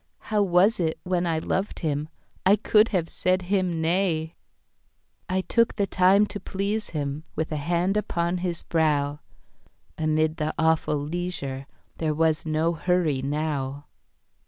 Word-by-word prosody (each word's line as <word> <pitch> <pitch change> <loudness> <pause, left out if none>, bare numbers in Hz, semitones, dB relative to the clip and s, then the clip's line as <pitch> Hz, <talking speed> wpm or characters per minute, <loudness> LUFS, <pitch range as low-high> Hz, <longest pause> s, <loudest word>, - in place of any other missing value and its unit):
How 210 -2 -1
was 195 +3 +3
it, 160 -2 -1
when 180 -1 0
I 165 -1 +1
loved 190 +5 -2
him,I 155 +5 -1
could 215 +1 +4
have 180 -7 -1
said 185 +1 0
him 185 -4 +1 1.5
nay!I 190 +1 +1
took 230 +4 +1
the 200 - +1
time 190 +2 +4
to 205 0 -6
please 200 +3 -3
him, 145 -1 -3
With 160 +1 -2
a 155 - -1
hand 175 +6 0
upon 175 -4 -1
his 175 -2 -2
brow. 150 -3 +1 0.8
Amid 155 0 +1
the 155 -1 -2
awful 160 -2 +2
leisureThere 155 -2 -4
was 160 0 +1
no 160 +2 +1
hurry 165 -4 +1
now. 145 -1 -2
170 Hz, 135 wpm, -25 LUFS, 155-185 Hz, 1.5 s, could